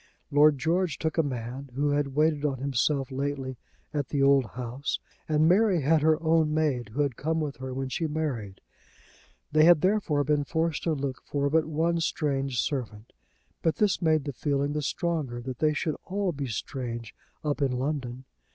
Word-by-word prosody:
Lord 145 0 +6
George 165 +2 0
took 160 +1 -1
a - - +7
man 130 -1 -5
who 145 +1 +1
had 145 -2 0
waited 150 -1 +2
on 140 -3 0
himself 135 +1 0
lately 135 -2 -3 0.3
at 145 -3 -2
the 140 -2 +1
old 140 -2 +5
house, 125 +3 -4 0.3
and 155 0 +4
Mary 190 -1 +4
had 155 +3 +3
her 155 +1 +3
own 160 -1 +3
maid 145 -7 0
who 130 +7 -1
had 140 -4 -2
come 160 +5 -1
with 150 -3 -3
her 130 0 -6
when 135 +1 -3
she 160 +5 -2
married. 135 -11 -3 0.9
They 155 +1 +5
had 170 -3 +7
therefore 185 -7 +2
been 145 0 +1
forced 160 +2 -1
to 165 - +2
look 135 -3 -3
for 140 -1 -1
but 160 0 +3
one 165 +2 +1
strange 135 -5 -1
servant. 115 -6 -3 0.5
But 165 - +1
this 205 -3 +1
made 155 -3 +3
the 145 -1 -4
feeling 140 +2 -1
the 150 - -1
stronger 150 -4 -2
that 125 0 -6
they 155 -1 +2
would 155 - 0
all 195 -1 -1
be 140 -3 -4
strange 115 -1 -5 0.3
up 150 -1 -1
in 135 -2 +2
London. 130 -1 -3
145 Hz, 185 wpm, -27 LUFS, 130-155 Hz, 0.9 s, a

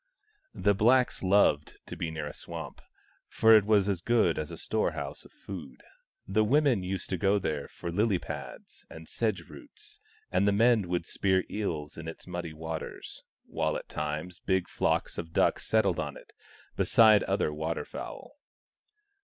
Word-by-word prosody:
The 100 - +2
blacks 120 +5 +3
loved 95 -6 +3
to - - -7
be 80 - -3
near 80 -2 -5
a 75 - -6
swamp, 80 -5 -8 0.5
for 110 0 +5
it 105 -2 +5
was 105 -2 +3
as 95 -4 -1
good 115 -6 +2
as 75 - -4
a - - -8
storehouse - - -2
of - - -16
food: 75 -11 -10 0.4
the 105 +3 +2
women 135 -2 +3
used 95 0 -4
to 95 - 0
go 100 +2 +3
there 75 -7 -2
for 85 - -7
lily 105 +2 +2
pads - - -8
and 80 0 -11
sedge 110 -4 -1
roots, 420 +8 -13 0.3
and 100 - +2
the - - +5
men 115 -2 +4
would 90 -1 -1
spear 95 -2 +1
eels 80 -8 -3
in 80 - -7
its 80 - -8
muddy 90 -2 -5
waters, 80 +1 -7 0.2
while - - -1
at - - -10
times 75 +4 -4
big 95 -2 0
flocks - - -1
of 80 -1 -7
duck - - +3
settled 100 -5 +1
on 75 -3 -4
it, - - -16 0.4
besides 110 -3 +5
other 75 - 0
water 80 +2 -3
fowl. 290 - -9
95 Hz, 170 wpm, -29 LUFS, 80-105 Hz, 0.5 s, for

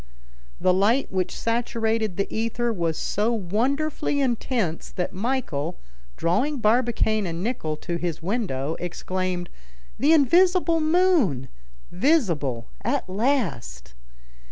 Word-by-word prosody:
The 185 - +3
light 215 +8 +2
which 185 -1 -1
saturated 225 -3 -1
the 200 - +1
ether 230 +1 0
was 170 -5 -1
so 210 +3 0
wonderfully 265 - 0
intense, 235 - -1
that 180 0 -3
Michel, 200 - -2 0.4
drawing 260 - +1
Barbicane 220 -3 +2
and 170 +1 -4
Nicholl 160 -10 -2
to 170 -2 -3
his 170 -2 -3
window, 165 - -2
exclaimed, 180 0 -3 0.5
"The 285 +6 +4
invisible 340 +3 +4
moon, 310 - +2 0.4
visible 175 - +1 0.2
at - - -1
last!" 185 - -1
215 Hz, 105 wpm, -24 LUFS, 175-260 Hz, 0.5 s, The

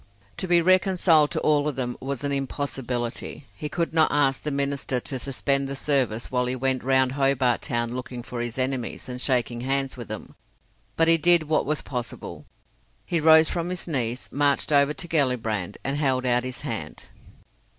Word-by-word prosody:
To 185 - -3
be 175 -1 +4
reconciled 180 -4 +4
to - - -2
all 150 -1 +2
of 150 - -2
them 125 -2 -2
was 135 0 -4
an 145 - -1
impossibility. 135 -2 -3
He 150 - -6
could 170 +1 -2
not 160 -1 +4
ask 135 -2 +2
the 150 - -3
minister 140 -2 -1
to 130 +2 -5
suspend 140 +1 -1
the 140 - -4
service 130 -6 0
while 125 -1 +1
he 125 - -1
went 130 0 0
round 130 0 +3
Hobart 135 -3 +2
Town 120 -1 -2
looking 125 -1 -6
for 125 0 -6
his 120 0 -4
enemies, 130 -1 -2
and 125 0 -6
shaking 120 -3 0
hands 135 +1 -1
with 120 - -7
them. 110 - -7 0.6
But 165 - +3
he 165 0 +5
did 175 +1 +4
what 155 -2 0
was 150 +1 -1
possible. 125 -3 -6 0.6
He 170 - 0
rose 160 0 +6
from 170 +2 -2
his 180 0 -4
knees, 125 -5 -2
marched 145 +2 +1
over 145 +1 +4
to 175 - -6
Gellibrand, 115 - 0
and 135 +1 -1
held 130 -3 +1
out 125 0 +2
his 130 -1 -6
hand. - - -5
135 Hz, 185 wpm, -25 LUFS, 125-150 Hz, 0.6 s, rose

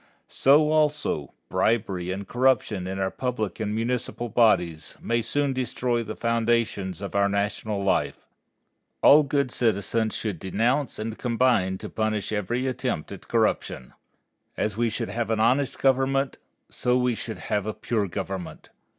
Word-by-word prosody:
So, 150 +3 +4
also, 150 - +1 0.2
bribery 100 -6 0
and 95 +1 -4
corruption 120 -7 +1
in 95 +1 -4
our 95 -1 -1
public 115 -7 -3
and 105 -1 -2
municipal 120 +1 -2
bodies, 90 -9 +2
may 115 0 0
soon 140 +3 0
destroy 125 -1 -1
the 110 -1 -6
foundations 115 -5 0
of 100 - -5
our 100 0 +3
national 100 0 -1
life. 100 - 0 0.8
All 150 +2 +8
good 140 -2 0
citizens 110 0 0
should 105 -7 -3
denounce 115 - 0
and 110 +1 -5
combine 115 -6 +2
to - - -7
punish 110 -2 -2
every 110 +5 -1
attempt 125 - -2
at - - -10
corruption. 65 - 0 0.6
As 105 -2 -1
we 115 +1 +1
should - - -3
have 115 +1 -2
an 110 -1 +1
honest 125 +5 +2
government, 135 +1 +1 0.3
so 125 0 0
we 125 -1 +2
should 110 0 -5
have 105 -1 -2
a 110 - -2
pure 110 -4 -1
government. 95 0 -6
115 Hz, 150 wpm, -25 LUFS, 100-125 Hz, 0.8 s, All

